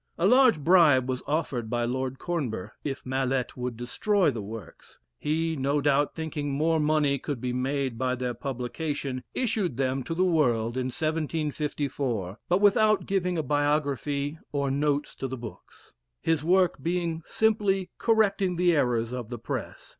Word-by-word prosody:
A 170 - +1
large 250 - +6
bribe 150 -5 +5
was 130 -1 -2
offered 140 -7 -1
by 120 0 0
Lord 130 +2 -2
Cornbur 135 - -3
if 140 -2 -4
Mallet 130 0 -1
would 125 -2 -4
destroy 180 - +1
the 115 -4 -5
works. 105 -1 -10 0.2
He, 160 +2 0
no 140 +1 +1
doubt, 145 0 +2
thinking 160 -3 -3
more 155 +4 +1
money 150 -2 +2
could 145 -2 -4
be 125 +1 -2
made 130 -1 -1
by 130 -1 +1
their 125 -1 -2
publication, 135 +1 -4
issued 215 - 0
them 135 0 0
to 165 - -3
the 180 - +2
world 120 -10 +2
in 130 -1 -1
1754, 145 - -2
but 180 +3 +3
without 215 0 +4
giving 180 -2 0
a 160 - 0
biography 145 0 0
or 140 -2 0
notes 145 +1 0
to 135 - -4
the 130 0 -5
books, 115 -2 -11 0.3
his 160 -2 0
work 180 -3 +3
being 170 0 -1
simply 205 -3 +1
correcting 200 -5 +2
the 175 -1 +3
errors 120 -5 +1
of 125 -3 -5
the 120 - -5
press. 115 - -6
145 Hz, 160 wpm, -27 LUFS, 130-165 Hz, 0.3 s, large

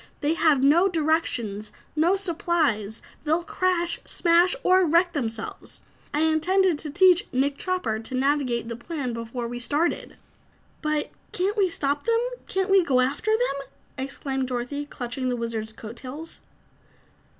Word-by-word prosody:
They 300 +1 +2
have 310 -5 +3
no 330 +7 +5
directions, 295 - -1 0.2
no 335 +5 +3
supplies; 320 - 0 0.2
they'll 320 +3 +1
crash, 350 -1 0
smash 345 +4 +3
or 370 +1 +5
wreck 345 +2 +3
themselves. 225 -6 -4 0.3
I 295 - 0
intended 320 +2 +3
to 305 - -2
teach 370 +4 +5
Nick 275 +2 0
Chopper 365 - -1
to 225 +3 -5
navigate 255 -3 +1
the 230 - -4
plane 260 0 -4
before 230 +1 -4
we 240 +1 -5
started!" 295 +7 -1 0.6
"But 305 -1 -1 0.2
can't 385 +3 0
we 395 -4 +3
stop 285 -3 0
them? 460 0 +3 0.3
Can't 380 0 -1
we 390 -2 +6
go 270 -5 +2
after 270 +11 0
them?" 435 - 0 0.3
exclaimed 265 0 -3
Dorothy, 255 +4 -3
clutching 255 -1 -4
the 250 - 0
Wizard's 225 -2 -3
coat 220 +2 -10
tails. 285 +7 -8
295 Hz, 145 wpm, -25 LUFS, 250-345 Hz, 0.6 s, we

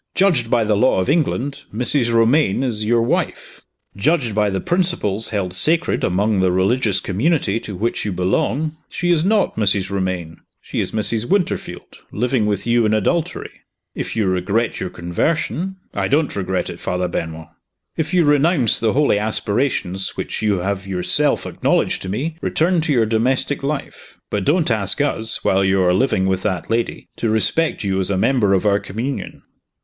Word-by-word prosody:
Judged 170 -12 +2
by 115 - +2
the 105 -1 +1
law 125 0 +3
of 95 +9 +1
England, 145 -3 -1
Mrs. 120 +2 +2
Romayne 115 +1 +3
is 110 -5 0
your 115 +1 +2
wife. 115 - -2 0.3
Judged 125 +1 +1
by 105 0 +2
the 95 -1 -2
principles 170 - 0
held 100 -5 -2
sacred 160 - +1
among 100 +3 +1
the 95 -1 +2
religious 100 +3 +1
community 115 - 0
to 105 -3 -7
which 115 +6 -2
you 105 - -2
belong, 115 - -1
she 175 0 -1
is 160 -2 +2
not 205 +2 +1
Mrs. 100 -3 +1
Romayne 95 -4 -3 0.2
she - - -5
is - - -1
Mrs. 110 +1 -1
Winterfield, 195 -3 -2
living 120 -1 0
with 100 -2 -2
you 120 0 +3
in 110 0 +2
adultery. 165 - -1 0.4
If - - -5
you 110 -2 +1
regret 95 +5 0
your 95 - -3
conversion 160 - -2
" - - -42
"I - - +1
don't 150 +1 +1
regret 95 -2 -2
it, - - -10
Father 90 0 -2
Benwell." 80 -2 -5 0.4
"If 155 0 -2
you 180 -2 +3
renounce 145 - +3
the 110 -2 +1
holy 140 -7 +2
aspirations 105 -2 -1
which - - -4
you 105 -4 +1
have 100 +1 -3
yourself 90 -2 +1
acknowledged - - 0
to 95 - -5
me, 150 - -3
return 170 +1 +1
to 155 -1 -1
your 120 -5 +3
domestic 125 +6 0
life. 145 +1 -5
But 100 -2 -1
don't 160 -4 +2
ask 105 0 +2
us, 115 -6 -1
while 95 0 +2
you 95 0 +2
are 90 0 +3
living 95 -2 +1
with 95 -1 0
that 95 +2 -3
lady, 115 +1 -2
to 115 - -1
respect 110 +9 +1
you 95 -1 0
as 95 - -1
a 100 - 0
member 105 -2 +2
of 95 - -1
our 100 -1 +3
communion." 120 +9 -5
110 Hz, 180 wpm, -19 LUFS, 95-140 Hz, 0.4 s, law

